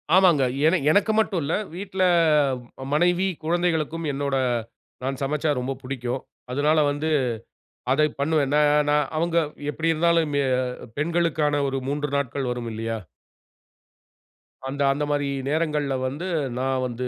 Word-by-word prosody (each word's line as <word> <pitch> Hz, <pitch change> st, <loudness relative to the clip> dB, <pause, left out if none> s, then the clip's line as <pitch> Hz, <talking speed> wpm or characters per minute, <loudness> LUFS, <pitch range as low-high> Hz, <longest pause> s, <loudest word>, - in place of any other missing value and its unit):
ஆமாங்க. 180 Hz, -7 st, +5 dB, 0.2 s
ஏனா 165 Hz, +4 st, +4 dB
எனக்கு 205 Hz, +5 st, +3 dB
மட்டும் 195 Hz, -5 st, +1 dB
இல்ல, 140 Hz, -, -1 dB, 0.2 s
வீட்ல 190 Hz, 0 st, -2 dB, 0.8 s
ம -, -, -5 dB
மனைவி, 175 Hz, +4 st, +3 dB, 0.2 s
குழந்தைகளுக்கும் 165 Hz, -1 st, 0 dB
என்னோட 140 Hz, 0 st, -1 dB, 0.7 s
நான் 135 Hz, 0 st, -2 dB
சமைச்சா 150 Hz, +2 st, 0 dB
ரொம்ப 130 Hz, +2 st, -2 dB
பிடிக்கும். 125 Hz, -1 st, -3 dB, 0.3 s
அதனால 150 Hz, +4 st, +2 dB
வந்து 150 Hz, +2 st, -2 dB, 0.8 s
அதை 150 Hz, +3 st, +4 dB
பண்ணுவேன். 145 Hz, -1 st, +1 dB
நான் 150 Hz, 0 st, +4 dB
நான் 150 Hz, -1 st, +3 dB
அவுங்க 170 Hz, +1 st, 0 dB, 0.3 s
எப்பிடி 165 Hz, +2 st, 0 dB
இருந்தாலும் 165 Hz, -1 st, +2 dB
மெ 140 Hz, -, +3 dB, 0.6 s
பெண்களுக்கான 155 Hz, -2 st, +1 dB
ஒரு 135 Hz, 0 st, -2 dB
3 145 Hz, +1 st, -1 dB
நாட்கள் 135 Hz, -1 st, -1 dB
வரும் 120 Hz, -1 st, -4 dB
இல்லயா! 115 Hz, +1 st, -3 dB, 1.7 s
அந்த, 140 Hz, +2 st, -4 dB
அந்தமாரி 145 Hz, 0 st, -1 dB, 0.2 s
நேரங்கள்ல 150 Hz, -3 st, 0 dB
வந்து 150 Hz, +8 st, -5 dB, 0.3 s
நான் 130 Hz, 0 st, 0 dB
வந்து 125 Hz, +1 st, -4 dB
150 Hz, 125 wpm, -24 LUFS, 135-165 Hz, 1.7 s, ஆமாங்க